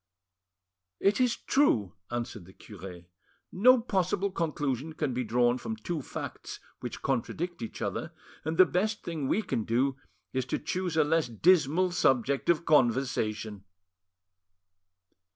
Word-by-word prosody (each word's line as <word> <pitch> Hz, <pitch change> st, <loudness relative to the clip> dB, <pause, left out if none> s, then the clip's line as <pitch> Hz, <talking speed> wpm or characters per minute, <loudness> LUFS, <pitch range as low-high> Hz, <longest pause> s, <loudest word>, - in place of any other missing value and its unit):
"It 200 Hz, +6 st, +2 dB
is 250 Hz, -2 st, +3 dB
true," 110 Hz, -, +2 dB, 0.2 s
answered 120 Hz, -5 st, -4 dB
the 95 Hz, -, -15 dB
cure, 95 Hz, -4 st, -10 dB, 0.5 s
"no 250 Hz, +7 st, +6 dB
possible 195 Hz, -3 st, 0 dB
conclusion 150 Hz, -4 st, -2 dB
can 150 Hz, -4 st, -2 dB
be 125 Hz, +1 st, -1 dB
drawn 120 Hz, +2 st, +2 dB
from 225 Hz, -, -4 dB
two 175 Hz, -8 st, -4 dB
facts -, -, -7 dB, 0.2 s
which -, -, -7 dB
contradict 175 Hz, +1 st, -2 dB
each 115 Hz, -, -5 dB
other, -, -, -3 dB, 0.3 s
and 160 Hz, +2 st, -2 dB
the 185 Hz, -, +9 dB
best 210 Hz, +5 st, -1 dB
thing 160 Hz, -5 st, -3 dB
we 220 Hz, -, +1 dB
can 115 Hz, -, -2 dB
do 130 Hz, +5 st, +1 dB, 0.4 s
is 130 Hz, -1 st, -1 dB
to -, -, -1 dB
choose 180 Hz, +1 st, -3 dB
a 155 Hz, -, +6 dB
less 160 Hz, -1 st, +1 dB
dismal 170 Hz, -, +3 dB
subject 135 Hz, -5 st, +1 dB
of 170 Hz, -1 st, +3 dB
conversation." 115 Hz, -7 st, +1 dB
150 Hz, 135 wpm, -29 LUFS, 120-180 Hz, 0.5 s, the